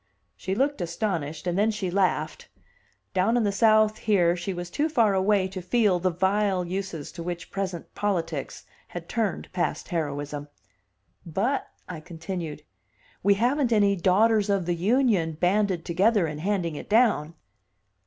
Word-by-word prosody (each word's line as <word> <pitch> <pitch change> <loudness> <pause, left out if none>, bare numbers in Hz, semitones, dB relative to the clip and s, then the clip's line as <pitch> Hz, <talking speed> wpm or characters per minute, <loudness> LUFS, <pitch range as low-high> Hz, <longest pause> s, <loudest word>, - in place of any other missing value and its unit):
She 190 - -3
looked 275 0 0
astonished, 165 -4 -3
and 175 -1 -1
then 215 +2 +3
she 205 -4 -2
laughed. 190 0 0 0.7
Down 195 +6 +2
in 240 - +2
the 205 - +1
South 215 +1 +4
here 180 -5 +3
she 180 +2 -4
was 175 -1 -6
too 305 - 0
far 230 -9 +3
away 190 0 +2
to 185 0 -6
feel 190 0 +2
the 185 +1 +1
vile 190 +1 +1
uses 180 -4 -5
to 170 - -8
which 175 0 -5
present 190 -4 -4
politics 165 -8 -3 0.2
had 170 -1 -8
turned 220 -7 -2
past 180 -1 -2
heroism. 145 -3 -3 0.8
"But," 205 - -1 0.2
I 175 -3 -6
continued, 165 -2 -6 0.6
"we 200 +1 +4
haven't 245 +4 +1
any 205 -3 +4
Daughters 205 +4 +3
of 195 -3 +1
the 175 - 0
Union 195 -2 +2
banded 180 +1 +1
together 195 +3 +2
and 150 -1 -5
handing 180 -4 -1
it - - -8
down." 210 -9 +3
190 Hz, 155 wpm, -26 LUFS, 170-210 Hz, 0.8 s, South